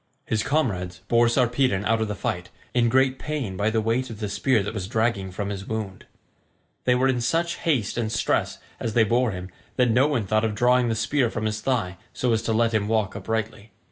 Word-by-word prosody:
His 110 -1 0
comrades 95 -11 -1
bore 120 0 +4
Sarpedon 120 -4 +1
out 115 +1 +2
of 110 - 0
the 105 - -3
fight, 90 -1 -3 0.2
in 120 -1 +3
great 130 +1 +2
pain 145 -11 -3
by 105 +3 +1
the 110 0 +1
weight 120 +4 0
of 110 -3 -8
the 105 -2 -3
spear 110 +1 +2
that 100 - -4
was 95 -4 -4
dragging 110 -3 0
from 100 +2 -4
his 100 -1 -5
wound. 110 -4 -5 0.8
They 125 - +4
were 130 +1 +3
in 125 -2 +1
such 165 +8 0
haste 125 - 0
and 110 -2 -1
stress - - 0 0.2
as 110 -2 -3
they 115 - +6
bore 120 +3 +2
him 90 -2 -6 0.2
that 125 -2 +3
no 130 +5 +4
one 130 -8 0
thought 110 +3 +1
of 110 -2 0
drawing 125 +1 +3
the 115 - 0
spear 120 +3 +1
from 110 -1 -3
his 110 0 -2
thigh 110 -9 -1 0.2
so 125 -1 +1
as 110 - +1
to 115 - -2
let 115 +1 +2
him 105 -2 +1
walk 110 -3 0
uprightly. 110 -1 -4
115 Hz, 225 wpm, -24 LUFS, 105-125 Hz, 0.8 s, they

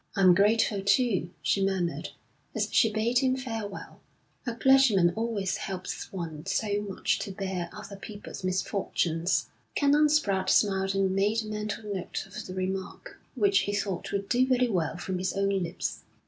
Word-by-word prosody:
'I'm 185 -2 +6
grateful, 205 +1 +3
too,' 200 -4 +2
she 195 - +2
murmured, 190 -3 -1 0.5
as - - +1
she 225 - +4
bade 225 +3 +2
him 260 -1 +2
farewell. 225 -6 -6 0.5
'A 235 - -2
clergyman 235 -9 +5
always 220 -5 -1
helps 185 -1 -5
one 165 -5 -5
so 205 +1 0
much 200 -2 -1
to 200 - -4
bear 190 -3 -3
other 210 -1 -9
people's 205 -1 -9
misfortunes.' 185 -2 0 0.3
Canon 290 +1 +4
Spratte 195 -11 +1
smiled 195 -1 +2
and 195 -1 +2
made 210 +3 +2
a - - -8
mental 210 0 -4
note 185 -3 -4
of 210 +3 -8
the 185 - -7
remark, 190 - -4 0.2
which 400 -1 +4
he 205 - -2
thought 195 -3 -3
would 200 0 -2
do 250 +3 +3
very 250 -1 +3
well 180 -4 -1
from 185 +1 -3
his 185 0 -1
own 195 0 +1
lips. 185 -3 -2
200 Hz, 160 wpm, -28 LUFS, 185-225 Hz, 0.5 s, I'm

